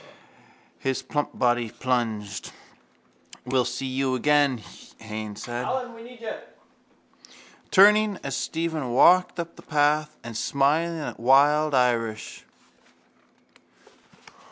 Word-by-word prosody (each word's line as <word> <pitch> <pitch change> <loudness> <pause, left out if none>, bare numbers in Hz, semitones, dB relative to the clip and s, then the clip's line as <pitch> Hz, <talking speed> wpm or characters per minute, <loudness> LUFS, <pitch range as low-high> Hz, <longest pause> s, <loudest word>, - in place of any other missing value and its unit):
His 135 -1 -2
plump 145 -1 -3
body 120 -2 +1
plunged. 110 -5 -3 0.9
—We'll 125 0 +1
see 135 - -4
you 130 0 -1
again, 145 -1 +2 0.4
Haines 110 -1 -7
said, 120 +1 -4 2.0
turning 210 +1 +5
as 135 -1 -3
Stephen 160 -6 -3
walked 180 +7 +5
up 170 0 -6
the - - -12
path 150 0 +1
and 120 -1 -8
smiling 150 +8 +1
at - - -6
wild 145 +4 +4
Irish. 115 -3 -1
135 Hz, 90 wpm, -25 LUFS, 120-150 Hz, 2.0 s, turning